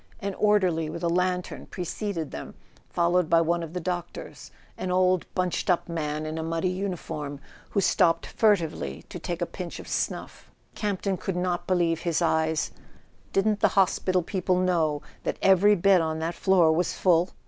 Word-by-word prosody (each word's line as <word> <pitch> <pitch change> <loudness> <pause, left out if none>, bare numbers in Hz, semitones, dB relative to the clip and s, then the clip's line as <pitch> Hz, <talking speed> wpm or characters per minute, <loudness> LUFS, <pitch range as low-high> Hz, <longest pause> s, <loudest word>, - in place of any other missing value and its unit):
An 200 -2 -3
orderly 185 -7 +2
with 165 +2 -6
a - - +2
lantern 180 +1 -1
preceded 180 -2 -4
them, 70 - -7 0.3
followed 175 0 +2
by 165 - +5
one 170 +1 +1
of 165 -1 -7
the 180 - -2
doc¬ 175 0 -2
tors, - - -10 0.3
an 185 - -4
old 185 0 +2
bunched 180 0 -1
up 180 - +2
man 155 -2 -3
in 155 +1 -4
a - - -2
muddy 165 +2 -1
uniform, 170 -7 -4 0.3
who 200 - +1
stopped 165 -2 +3
furtively 165 - 0
to - - -7
take 175 0 -3
a - - +1
pinch 175 0 -7
of - - -10
snuff. - - -4 0.2
Camp 205 -3 -2
ton 195 -2 0
could 190 +1 -3
not 180 -1 -1
believe 170 -3 +2
his 165 -1 0
eyes; 160 -2 +1 0.6
didn't 210 +1 +2
the - - +5
hospital 185 -1 +2
people 185 0 0
know 165 -5 +1 0.2
that - - -2
every 195 +2 +5
bed 190 -1 +4
on 160 -1 -1
that 165 +2 -2
floor 180 -3 +4
was 170 +3 +1
full? 175 -1 +3
175 Hz, 180 wpm, -26 LUFS, 165-185 Hz, 0.6 s, by